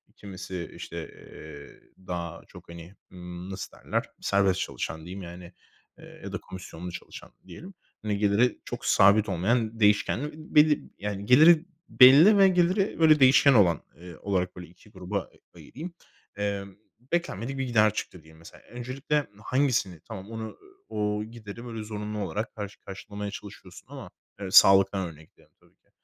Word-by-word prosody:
Kimisi, 95 -3 -8
işte, - - -8
eee, 70 -1 -13 0.3
daha 85 -2 -5
çok, - - -15
hani, 85 +3 -11 0.2
ımm, 90 0 -9
nasıl 95 0 -7
derler, - - -2 0.2
serbest 95 -2 +2
çalışan 80 - -4
diyeyim 95 +3 -8
yani, 90 0 -10 0.4
eee, - - -15
ya - - -7
da - - -1
komisyonlu 90 -1 -9
çalışan - - -10 0.2
diyelim. 190 +4 -11 0.3
Hani, 105 -1 -2
geliri 105 +4 +2
çok - - -7
sabit 100 +2 +4
olmayan 110 +5 0
değişkenli 105 +7 +2 0.2
belli, 150 0 +5
yani, 100 -1 -5
geliri 155 +8 +6 0.2
belli 145 +11 +8
ve 195 -1 +7
geliri 185 +2 +1
böyle 155 -2 +6
değişken 135 +1 +6
olan, 90 - +4 0.2
eee, 85 0 -11
olarak 90 -2 -2
böyle 90 -1 -9
2 90 +5 -21
gruba 95 0 -4
a - - -16 0.3
ayırayım. 170 +6 -9 0.4
Emm, 100 -1 -3 0.4
beklenmedik 135 - -2
bir 135 - -1
gider 110 -4 +3
çıktı 90 -5 -6
diyelim 80 0 -18
mesela. 85 - -15
Öncelikle 135 +4 -2 0.2
hangisini 125 - 0
tamam 105 -1 -9
onu 110 -1 -7 0.3
o 105 0 -2
gideri, 115 0 -10
böyle, 115 -2 -6
zorunlu 105 0 -5
olarak 105 +3 -4
karşı 105 -1 -7
karşılamaya 100 +1 -7
çalışıyorsun 105 -1 -11
ama, - - -9 0.3
eee, 95 -2 -5
sağlıktan 95 -1 +6
örnekleyelim 80 -1 -19
tabii - - -28
ki. - - -41
105 Hz, 150 wpm, -27 LUFS, 95-125 Hz, 0.4 s, belli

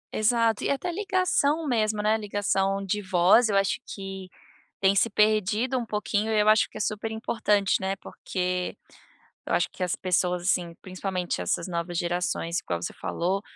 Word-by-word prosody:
Exato, 225 0 +2
e - - +1
até 280 +6 -1
ligação 365 -5 +1
mesmo, 215 -5 +1
né, 215 +1 +2
ligação 195 -2 0
de 205 +2 -1
voz 190 +5 +4
eu 205 - 0
acho 195 0 +2
que 195 -1 -7 0.5
tem 195 0 +5
se 200 - +3
perdido 215 +4 +2
um 240 - -4
pouquinho 210 0 -1
e 210 - +4
eu 210 - +4
acho 215 0 +4
que - - -10
é - - -3
super 215 +2 -2
importante, 210 -3 +1
né, 190 +1 -1
porque 180 -2 -3 0.7
eu - - -2
acho - - +2
que 185 - -5
as 180 - 0
pessoas 180 -1 0
assim 175 -1 0
principalmente 185 - -3
essas 165 - -1
novas 175 0 -3
gerações 175 0 -1
igual 85 -1 -4
você - - -3
falou, 185 +3 -2
200 Hz, 175 wpm, -26 LUFS, 180-220 Hz, 0.7 s, tem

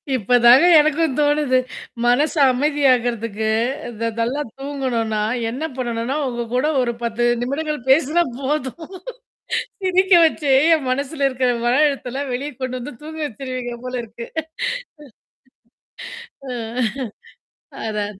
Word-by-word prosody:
இப்பதாங்க 245 - +6
எனக்கும் 310 -1 +2
தோணுது. 290 -3 +2 0.5
மனசு 280 +7 +2
அமைதியாகறதுக்கு 245 -6 +1 0.5
த 230 - +1
நல்லா 245 +6 0 0.2
தூங்கணும்னா, 250 -6 -2 0.3
என்ன 255 +7 -5
பண்ணணும்னா, 240 +1 -2
உங்க 240 -1 -3
கூட 255 +4 +2
ஒரு 240 -1 0
10 235 +1 0 0.2
நிமிடங்கள் 300 +4 -2
பேசினா 310 +5 +4 0.2
போதும். 285 +3 -3 1.0
சிரிக்க 375 +1 +2
வச்சே 305 -3 +1 0.2
என் 300 -4 -2
மனசுல 280 +2 -1
இருக்கிற 255 -1 0 0.2
மன 240 - +3
அழுத்தெல்லாம் 275 -1 -3
வெளியே 280 +4 -4
கொண்டு 255 0 -3
வந்து 275 +3 -7
தூங்க 315 +1 -8
வச்சுருவீங்க 255 -1 -5
போல 255 0 -4
இருக்கு. 230 +1 -9 2.2
ஆ. - - -4 1.4
அதா. 210 -1 -2
260 Hz, 110 wpm, -20 LUFS, 240-295 Hz, 2.2 s, இப்பதாங்க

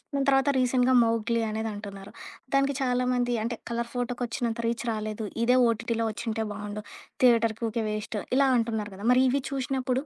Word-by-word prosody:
దాని 275 -1 +1
తర్వాత 270 +1 +3
రీసెంట్‌గా 255 0 +3
మౌగ్లీ 230 0 +1
అనేదంటున్నారు. 205 -2 -6 0.4
దానికి 275 0 +2
చాలామంది 250 -1 +1
అంటే, 235 +1 -2 0.2
'కలర్ 235 0 -2
ఫోటోకి' 245 0 -2
వచ్చినంత 235 0 -3
రీచ్ 235 +1 -2
రాలేదు. 215 0 -4 0.2
ఇదే 250 +2 +4
ఓటీటీలో 230 0 -1
వచ్చింటే 225 0 -3
బావుండు. 210 0 -6 0.4
థియేటరుకీ 230 -2 +4
ఊకే 225 +1 -2
వేస్ట్ 215 +1 -4 0.2
ఇలా 275 0 +5
అంటున్నారు 220 -3 -2
గదా! 200 +3 -8
మరి 255 +1 +4
ఇవి 275 +2 +1
చూసినప్పుడు, 265 -1 -1
235 Hz, 155 wpm, -27 LUFS, 220-250 Hz, 0.4 s, ఇలా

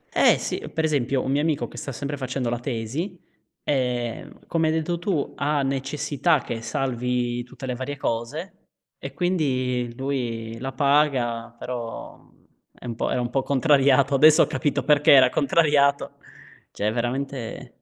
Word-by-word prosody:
Eh, - - +5
sì, - - -3 0.2
per 160 - 0
esempio 135 -4 +1
un - - -2
mio 140 +2 +2
amico 155 -1 0
che - - -13
sta 135 - -5
sempre 145 +3 -4
facendo 130 -2 -3
la 120 - -1
tesi, 130 - -4 0.5
ehm, 125 -4 -2
come 165 -1 +1
hai 155 - +2
detto 160 +2 -1
tu, 175 -4 -2
ha 145 0 0
necessità 140 +3 0
che 115 -2 -5
salvi 125 -1 -1
tutte 125 +2 -12
le 125 -1 -3
varie 130 +3 -5
cose 140 - -3 0.4
e - - -8
quindi 130 -9 0
lui 120 -4 -3
la 135 +3 -5
paga, 130 -5 +1
però, 120 -1 -6
uhm, - - -27 0.3
è - - -12
un 115 -2 -4
po' - - -1
era - - 0
un 120 -1 -2
po' 135 +2 0
contrariato. 140 -1 +3
Adesso 155 +2 +7
ho - - +3
capito 135 +2 -1
perché 150 +1 +4
era 130 -2 +7
contrariato. 145 -2 +2 0.6
Cioè 105 - -1
è - - 0
veramente 125 +1 -3
135 Hz, 165 wpm, -24 LUFS, 120-145 Hz, 0.6 s, Adesso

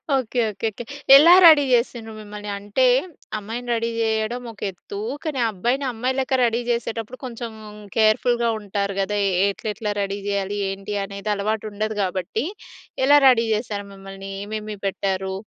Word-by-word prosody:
Okay. 250 -1 -1
Okay. 205 +3 -3
Okay. 240 - -7 0.3
ఎలా 330 +5 +9
ready 310 -3 +8
చేసిండ్రు 235 -2 0
మిమ్మల్ని. 210 0 -8
అంటే 205 +6 0 0.5
అమ్మాయిని 230 +4 -6
రెడీ 230 0 -1
చేయడం 220 +2 -1
ఒక 215 - -18
ఎత్తు. 200 +2 -9 0.2
కానీ 300 -5 -3
ఆ - - +2
అబ్బాయిని 245 +9 -1
అమ్మాయి 255 +4 -2
లెక్క 260 0 0
రెడీ 230 +1 0
చేసేటప్పుడు 230 +1 -3
కొంచెం 235 -1 -6 0.4
కేర్‌ఫుల్‌గా 230 +2 +3
ఉంటారు 200 -1 -3
కదా! 205 +1 -1
ఏ - - -1 0.2
ఎట్లెట్లా 210 +1 -4
రెడీ 200 0 -2
చేయాలి? 200 0 -1
ఏంటి 195 +1 -5
అనేది 200 +2 -5
అలవాటు 215 +2 -2
ఉండదు 215 +1 -3
కాబట్టి, 190 - -2 0.6
ఎలా 290 +1 +7
రెడీ 230 -3 +5
చేసారు 210 -2 -4
మిమ్మల్ని? 195 0 -9
ఏమేమి 215 0 -5
పెట్టారు? 190 -1 -2
215 Hz, 150 wpm, -22 LUFS, 200-240 Hz, 0.6 s, ఎలా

